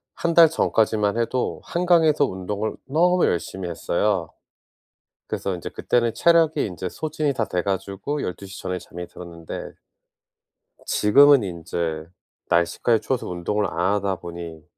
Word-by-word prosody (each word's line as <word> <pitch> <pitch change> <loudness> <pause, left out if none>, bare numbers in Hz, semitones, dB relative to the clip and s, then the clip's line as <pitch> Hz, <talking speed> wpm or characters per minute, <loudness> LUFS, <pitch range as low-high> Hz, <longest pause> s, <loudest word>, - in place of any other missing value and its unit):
1 170 -1 -1
달 165 -2 +8
전까지만 110 -6 +1
해도 120 +2 -1
한강에서 165 -4 +3
운동을 100 +1 -4
너무 175 +5 +3
열심히 90 +1 -2
했어요. 85 +2 -1 1.0
그래서 100 - -3
인제 85 - -6
그때는 120 -2 0
체력이 165 -3 +3
인제 90 -1 -5
소진이 155 - -2
다 115 - -1
돼 90 -1 -1
가지고 100 +8 -3
12:00 95 +1 -6
전에 90 -1 -3
잠이 90 0 -9
들었는데. 85 -2 -8 1.1
지금은 140 +5 +5
인제 85 -3 -4 0.4
날씨까지 95 +6 +2
추워서 130 -3 -2
운동을 90 +4 -1
안 90 +4 0
하다 100 -2 -1
보니 85 -2 -8
100 Hz, 290 characters per minute, -23 LUFS, 90-140 Hz, 1.1 s, 달